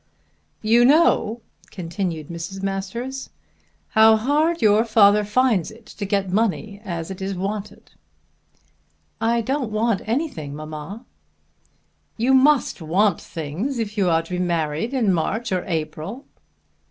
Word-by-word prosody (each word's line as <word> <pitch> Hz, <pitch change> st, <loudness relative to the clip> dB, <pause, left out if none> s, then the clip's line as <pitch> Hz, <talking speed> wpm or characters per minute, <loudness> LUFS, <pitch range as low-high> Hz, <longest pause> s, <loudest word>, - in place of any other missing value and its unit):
"You 230 Hz, +3 st, +5 dB
know," 245 Hz, -5 st, +3 dB, 0.3 s
continued 170 Hz, -4 st, -4 dB
Mrs. 170 Hz, +3 st, -6 dB
Masters, 215 Hz, +8 st, -4 dB, 0.6 s
"how 220 Hz, 0 st, +6 dB
hard 300 Hz, +9 st, +1 dB
your 215 Hz, 0 st, +4 dB
father 210 Hz, -2 st, +5 dB
finds 210 Hz, -4 st, +1 dB
it 220 Hz, +1 st, -15 dB
to 205 Hz, -, -7 dB
get 195 Hz, -2 st, 0 dB
money 210 Hz, 0 st, -1 dB
as 170 Hz, -3 st, -5 dB
it 190 Hz, -, -8 dB
is 195 Hz, 0 st, -3 dB
wanted." 200 Hz, +3 st, -5 dB, 1.3 s
"I 230 Hz, +1 st, +2 dB
don't 260 Hz, 0 st, -2 dB
want 215 Hz, -1 st, +1 dB
anything, 220 Hz, -, -3 dB
mamma." 155 Hz, -, -8 dB, 1.1 s
"You 245 Hz, +4 st, +2 dB
must 265 Hz, -, +3 dB
want 180 Hz, +4 st, +1 dB
things 170 Hz, -, -4 dB
if 215 Hz, -2 st, -3 dB
you 195 Hz, -4 st, +2 dB
are 165 Hz, 0 st, +2 dB
to 165 Hz, -, -14 dB
be 180 Hz, -, -2 dB
married 165 Hz, -, -1 dB
in 220 Hz, -7 st, +2 dB
March 220 Hz, +7 st, -1 dB
or 185 Hz, -1 st, 0 dB
April." 160 Hz, -, -4 dB
205 Hz, 130 wpm, -22 LUFS, 175-235 Hz, 1.3 s, how